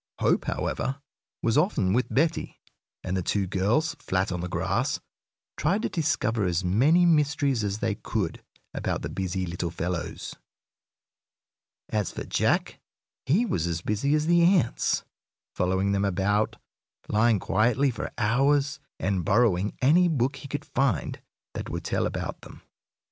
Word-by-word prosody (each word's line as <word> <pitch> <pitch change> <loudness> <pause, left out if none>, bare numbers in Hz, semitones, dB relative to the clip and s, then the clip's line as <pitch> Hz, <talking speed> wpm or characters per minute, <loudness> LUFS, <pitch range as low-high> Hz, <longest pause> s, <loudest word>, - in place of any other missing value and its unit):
Hope, - - +2
however, 135 +1 -2 0.4
was 115 +4 +3
often 105 - +1
with 125 +3 +2
Betty, 160 +4 0 0.4
and 95 0 -2
the 95 - 0
two 100 +3 0
girls, 105 - +1
flat 95 +1 -1
on 90 -1 -2
the 90 - -4
grass, - - 0 0.6
tried 195 +9 +1
to - - 0
discover 140 - 0
as 90 0 0
many 140 - +4
mysteries 145 -6 +2
as 100 0 -1
they 110 -1 0
could 100 -4 -3 0.3
about - - -2
the - - -3
busy 95 0 -2
little 85 0 -3
fellows. 85 0 -4 1.6
As 105 -4 0
for - - -5
Jack, - - 0 0.5
he 185 - +3
was 85 - -1
as 85 -1 -2
busy 110 +10 +1
as 155 0 +1
the 170 +1 +4
ants, 170 -8 +2 0.5
following 95 +2 +1
them 100 0 +1
about, 100 +3 +1 0.5
lying 110 +1 +3
quietly 125 +7 +2
for 115 - -5
hours, 140 +6 +2 0.2
and 95 -2 0
borrowing 105 -1 +2
any 170 +7 +5
book 135 -5 0
he - - -9
could 145 +1 -4
find 135 -3 -1 0.3
that - - -5
would - - -4
tell - - 0
about - - -5
them. - - -13
110 Hz, 150 wpm, -26 LUFS, 95-145 Hz, 1.6 s, any